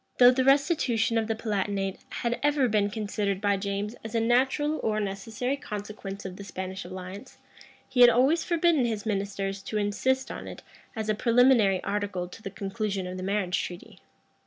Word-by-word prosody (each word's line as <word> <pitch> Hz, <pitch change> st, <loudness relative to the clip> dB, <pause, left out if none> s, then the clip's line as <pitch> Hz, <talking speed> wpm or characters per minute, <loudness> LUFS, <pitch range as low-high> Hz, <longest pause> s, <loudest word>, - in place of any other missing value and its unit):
Though 245 Hz, 0 st, +8 dB
the 260 Hz, +1 st, +1 dB
restitution 270 Hz, -5 st, +3 dB
of 220 Hz, -, -2 dB
the 225 Hz, -, 0 dB
Palatinate 200 Hz, -3 st, -2 dB
had 240 Hz, -1 st, -2 dB
ever 290 Hz, -2 st, +3 dB
been 210 Hz, -2 st, +2 dB
considered 205 Hz, -2 st, -2 dB
by 200 Hz, -1 st, +2 dB
James 200 Hz, +2 st, -3 dB
as 220 Hz, +1 st, -6 dB
a -, -, +3 dB
natural 265 Hz, +6 st, +2 dB
or 215 Hz, -1 st, 0 dB
necessary 215 Hz, +6 st, -2 dB
consequence 205 Hz, -5 st, -7 dB
of 185 Hz, -1 st, -6 dB
the 200 Hz, -, -8 dB
Spanish 190 Hz, 0 st, -6 dB
alliance, 185 Hz, +6 st, -9 dB, 0.5 s
he 250 Hz, -, +1 dB
had 245 Hz, -, +10 dB
always 270 Hz, +8 st, +3 dB
forbidden 335 Hz, -5 st, +2 dB
his 220 Hz, -3 st, -2 dB
ministers 195 Hz, -1 st, -2 dB
to 215 Hz, +2 st, -4 dB
insist 235 Hz, +6 st, 0 dB
on -, -, -7 dB
it -, -, -9 dB, 0.3 s
as 220 Hz, -1 st, -3 dB
a 215 Hz, -, +2 dB
preliminary 230 Hz, -4 st, +4 dB
article 200 Hz, -3 st, -2 dB
to 200 Hz, -, -12 dB
the 195 Hz, -, -5 dB
conclusion 195 Hz, 0 st, -3 dB
of 180 Hz, 0 st, -5 dB
the -, -, -5 dB
marriage 195 Hz, -1 st, 0 dB
treaty. 175 Hz, 0 st, -9 dB
210 Hz, 180 wpm, -27 LUFS, 195-245 Hz, 0.5 s, had